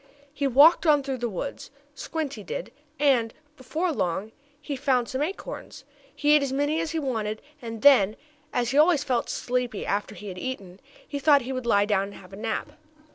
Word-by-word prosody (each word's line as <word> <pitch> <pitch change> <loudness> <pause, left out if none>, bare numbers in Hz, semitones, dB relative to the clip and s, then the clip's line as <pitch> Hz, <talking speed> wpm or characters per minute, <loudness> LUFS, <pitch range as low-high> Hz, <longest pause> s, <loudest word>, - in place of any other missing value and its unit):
He 285 -2 0
walked 295 +7 +6
on 295 -2 +5
through 265 -2 -3
the 240 0 -1
woods, 215 +8 -5 0.2
Squinty 290 -6 -4
did, 175 - -5 0.3
and, 255 -6 +3 0.2
before 310 +5 -3
very 310 - -3
long, 190 +5 -1 0.3
he 290 -1 -5
found 255 -2 +1
some 260 +2 -3
acorns. 390 +10 -5 0.3
He 295 0 +2
ate 300 - +5
as 275 -2 -1
many 290 +4 0
as 330 - -2
he 325 - -3
wanted 220 -7 -2 0.2
and 225 -2 -7
then, 220 -8 +6 0.4
as 245 -1 0
he 280 - +3
always 310 -2 +5
felt 250 -4 -1
sleepy 245 -3 -2
after 205 +1 -2
he 205 0 -8
had 180 -1 -7
eaten, 195 -6 -6 0.3
he 285 - -4
thought 285 -1 +5
he 260 +2 -4
would 255 -2 -4
lie 205 -3 +4
down 200 -2 +1
and 200 - -10
have 185 0 -14
a - - -6
nap. 220 +2 -3
255 Hz, 200 wpm, -26 LUFS, 215-290 Hz, 0.4 s, walked